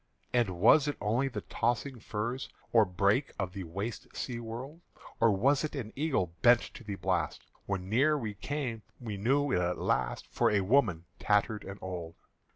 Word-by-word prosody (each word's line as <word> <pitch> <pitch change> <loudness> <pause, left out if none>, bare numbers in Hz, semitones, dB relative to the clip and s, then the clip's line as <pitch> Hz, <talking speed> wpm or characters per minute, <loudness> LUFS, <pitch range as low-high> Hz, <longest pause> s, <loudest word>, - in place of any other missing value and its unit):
And 105 -8 +1
was 140 - +6
it 145 - -2
only 115 +6 +1
the 130 - -4
tossing 120 +2 -1
furze 115 +5 -3 0.2
Or 115 -2 +7
brake 100 +8 +1
of 95 -2 -3
the 95 -2 -5
waste 100 +7 -5
sea 120 -2 -3
wold? 125 +8 -7 0.4
Or 115 - +5
was 135 +9 +3
it 155 - -3
an 115 -6 -5
eagle 135 - 0
bent 120 -1 +7
to - - -11
the 105 -3 -4
blast? 90 -4 -1 0.2
When 95 -2 -2
near 140 +9 +3
we 110 -6 -3
came, 125 +1 -3 0.2
we 110 -5 -5
knew 135 +7 +2
it - - +3
at 90 0 0
last - - 0
For - - +3
a 100 -2 +2
woman 95 -6 +2
tattered 105 +1 +1
and 95 +1 -7
old. 85 -3 -5
110 Hz, 180 wpm, -31 LUFS, 95-130 Hz, 0.4 s, Or